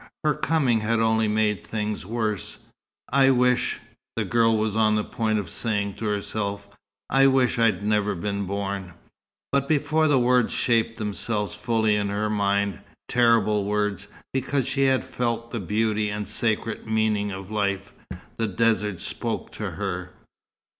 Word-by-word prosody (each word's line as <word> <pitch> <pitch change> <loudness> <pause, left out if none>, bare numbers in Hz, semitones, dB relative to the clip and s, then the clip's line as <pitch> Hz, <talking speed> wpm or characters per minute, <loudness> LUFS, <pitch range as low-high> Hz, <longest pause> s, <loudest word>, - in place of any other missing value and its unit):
Her 150 -1 +3
coming 150 -7 +1
had 110 +1 0
only 110 -1 +2
made 105 -2 +1
things 105 -3 -3
worse. 110 -3 -2 0.5
"I 135 +1 +5
wish 125 -1 +2 0.2
" - - -66
the - - -1
girl 115 -1 +3
was 110 -1 -1
on 110 -1 +3
the 105 - +1
point 110 -1 -1
of 100 -4 -3
saying 100 0 -1
to 115 - -5
herself 100 -1 -2 0.4
"I 135 0 +5
wish 130 -2 +2
I'd 110 -4 +2
never 105 -1 +1
been 100 +3 -2
born." 100 -2 -4 0.6
But 140 0 +1
before 155 +1 +2
the 145 -2 +4
words 125 -1 +3
shaped 115 -1 +1
themselves 105 0 -2
fully 110 0 +1
in 100 -1 0
her 105 +1 -1
mind 100 -2 0 0.3
terrible 115 -4 +3
words, 105 -1 -1 0.3
because 135 0 0
she 135 0 +1
had 130 -1 +2
felt 115 -1 -2
the 115 - -3
beauty 105 +2 0
and 105 0 -4
sacred 110 -1 -1
meaning 110 -2 +1
of 95 +1 -7
life 100 -2 -1 0.4
the 115 - 0
desert 105 -2 +1
spoke - - -4
to - - -4
her. 90 -2 -4
110 Hz, 155 wpm, -25 LUFS, 100-120 Hz, 0.6 s, I